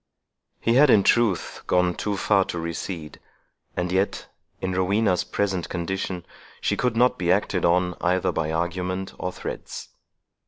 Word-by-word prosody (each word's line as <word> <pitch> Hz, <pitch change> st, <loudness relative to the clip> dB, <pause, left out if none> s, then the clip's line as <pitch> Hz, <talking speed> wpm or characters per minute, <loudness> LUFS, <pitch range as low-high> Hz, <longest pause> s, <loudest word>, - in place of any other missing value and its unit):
He 115 Hz, -, +2 dB
had, 140 Hz, +3 st, +6 dB
in 105 Hz, -5 st, +6 dB
truth, 115 Hz, -6 st, +2 dB
gone 90 Hz, 0 st, +3 dB
too 100 Hz, +3 st, -2 dB
far 100 Hz, -1 st, +3 dB
to -, -, -4 dB
recede; 85 Hz, -1 st, -5 dB, 0.6 s
and 90 Hz, 0 st, -1 dB
yet, 95 Hz, +2 st, 0 dB, 0.3 s
in 95 Hz, 0 st, -2 dB
Rowena's 95 Hz, +1 st, +2 dB
present 95 Hz, -4 st, -1 dB
condition, 90 Hz, 0 st, -3 dB, 0.3 s
she -, -, 0 dB
could 125 Hz, -2 st, 0 dB
not 125 Hz, +2 st, +3 dB
be 85 Hz, -1 st, +2 dB
acted 95 Hz, -2 st, +1 dB
on 90 Hz, +1 st, +3 dB
either 90 Hz, +1 st, +2 dB
by 80 Hz, -2 st, -1 dB
argument 90 Hz, +3 st, -2 dB
or 90 Hz, -, -2 dB
threats. -, -, -7 dB
90 Hz, 150 wpm, -24 LUFS, 90-100 Hz, 0.6 s, had